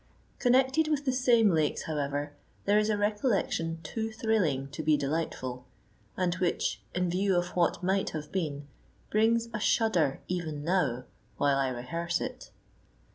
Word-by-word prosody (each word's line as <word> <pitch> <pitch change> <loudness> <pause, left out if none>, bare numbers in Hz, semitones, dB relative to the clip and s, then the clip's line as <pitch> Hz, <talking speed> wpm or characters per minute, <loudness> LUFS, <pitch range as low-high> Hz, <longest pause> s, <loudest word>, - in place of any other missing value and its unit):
Connected 265 +5 +3
with 295 -2 0
the 260 - +2
same 240 -5 +4
lakes, 155 -3 +1
however, 145 -1 -2 0.3
there 205 +1 +4
is 215 0 +1
a 210 - +2
recollection 205 -6 0
too 225 -1 -3
thrilling 205 - 0
to 145 +3 -5
be 155 -1 +3
delightful, 135 -4 -3 0.5
and 180 -2 +1
which, 180 -1 -1
in 180 0 +1
view 190 +2 +1
of 175 0 +1
what 175 0 0
might 190 +2 +1
have 150 -1 -6
been, 150 -6 -2 0.5
brings 225 +2 +3
a 215 - -2
shudder 185 - +2
even 160 -5 -3
now 150 -8 +1 0.3
while 140 -1 +3
I 135 - +2
rehearse 165 +8 -2
it. - - -6
175 Hz, 150 wpm, -29 LUFS, 150-215 Hz, 0.5 s, same